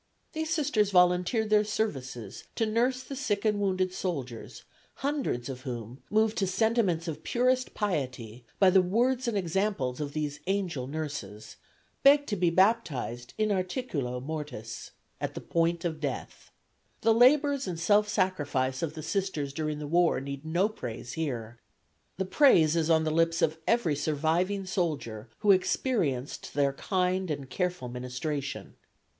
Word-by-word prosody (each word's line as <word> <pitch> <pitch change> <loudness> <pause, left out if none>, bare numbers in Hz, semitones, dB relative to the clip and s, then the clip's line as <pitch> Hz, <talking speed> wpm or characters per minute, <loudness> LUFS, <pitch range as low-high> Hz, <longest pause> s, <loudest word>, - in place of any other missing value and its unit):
These 315 0 -3
Sisters 280 -10 +2
volunteered 180 +4 +3
their 210 0 +5
services 135 - -4
to 225 - +1
nurse 245 +4 +1
the 275 - -7
sick 225 -7 -1
and 210 -1 +2
the - - 0
wounded 185 -1 0
soldiers, 135 -12 -5 0.3
hundreds 275 - -2
of 130 -2 -6
whom, 120 -1 -6
moved 220 +1 +2
to 195 - +1
sentiments 190 -4 +1
of 155 -1 -4
purest 255 +1 +1
piety 125 - -3
by 190 -2 +6
the 190 0 +6
words 240 +7 +1
and 225 -3 0
example 190 -5 0
of 140 +2 -5
these 150 -1 -3
angel 185 -10 -1
nurses, 140 -9 -6 0.4
begged 285 +1 +6
to 210 - 0
be 180 -3 +2
baptized 165 - +1
in 215 -1 +1
articulo 180 - -2
mortis 130 -6 -6 0.3
at - - -4
the - - -4
point 170 +1 0
of 160 -2 -2
death. 145 -3 -5 0.5
The 225 0 +4
labors 275 +3 +4
and 175 -3 -4
self 205 +5 +3
sacrifice 145 -10 0
of 160 -2 -3
the 155 - -6
Sisters 175 -9 -2
during 155 0 -2
the 150 - -5
war 170 +3 +3
need 140 +1 -6
no 170 +5 +1
praise 120 - -7
here. 120 -8 -4 0.6
The 190 - -1
praise 175 - +5
is 165 -1 +1
on 160 -1 +4
the 155 - 0
lips 165 +1 +2
of 160 +1 +1
every 230 -11 +2
surviving 160 +7 0
soldier 150 - -2
who 205 - +5
experienced 185 - 0
their 140 -1 +2
kind 185 +3 0
and 140 -3 -3
careful 180 -8 -2
ministration. 125 +4 -4
170 Hz, 155 wpm, -29 LUFS, 140-210 Hz, 0.6 s, by